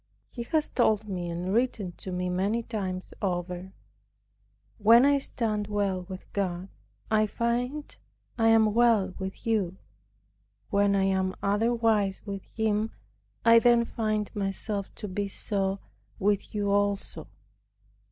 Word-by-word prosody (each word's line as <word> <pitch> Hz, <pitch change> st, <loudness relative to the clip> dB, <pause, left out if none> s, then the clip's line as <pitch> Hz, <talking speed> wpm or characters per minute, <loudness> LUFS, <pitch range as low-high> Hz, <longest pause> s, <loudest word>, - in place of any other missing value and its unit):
He 240 Hz, -, -6 dB
has 310 Hz, +3 st, +1 dB
told 215 Hz, -3 st, +1 dB
me 180 Hz, -3 st, -3 dB
and 175 Hz, +3 st, -3 dB
written 225 Hz, -5 st, 0 dB
to 190 Hz, -, -6 dB
me 180 Hz, 0 st, -2 dB
many 195 Hz, +6 st, 0 dB
times 190 Hz, -5 st, -4 dB
over, 180 Hz, -1 st, -3 dB, 1.1 s
"When 230 Hz, +4 st, +7 dB
I 285 Hz, 0 st, +4 dB
stand 215 Hz, -6 st, -2 dB
well 195 Hz, -3 st, -1 dB
with 185 Hz, 0 st, -7 dB
God, 185 Hz, -1 st, -2 dB, 0.4 s
I 215 Hz, 0 st, +4 dB
find 245 Hz, +7 st, -2 dB, 0.4 s
I 225 Hz, -1 st, +2 dB
am 220 Hz, -2 st, +5 dB
well 225 Hz, -5 st, +3 dB
with 190 Hz, +5 st, -6 dB
you. 200 Hz, -5 st, 0 dB, 0.9 s
When 200 Hz, 0 st, +3 dB
I 195 Hz, -, +2 dB
am 190 Hz, -1 st, +1 dB
otherwise 215 Hz, -1 st, +1 dB
with 200 Hz, -2 st, -5 dB
Him, 220 Hz, -1 st, 0 dB, 0.6 s
I 230 Hz, 0 st, +8 dB
then 235 Hz, 0 st, +4 dB
find 215 Hz, -2 st, -2 dB
myself 200 Hz, 0 st, -2 dB
to 210 Hz, -, -6 dB
be 200 Hz, +1 st, -2 dB
so 195 Hz, 0 st, -1 dB, 0.4 s
with 205 Hz, +1 st, 0 dB
you 205 Hz, -1 st, 0 dB
also." 200 Hz, 0 st, 0 dB
205 Hz, 135 wpm, -28 LUFS, 190-225 Hz, 1.1 s, I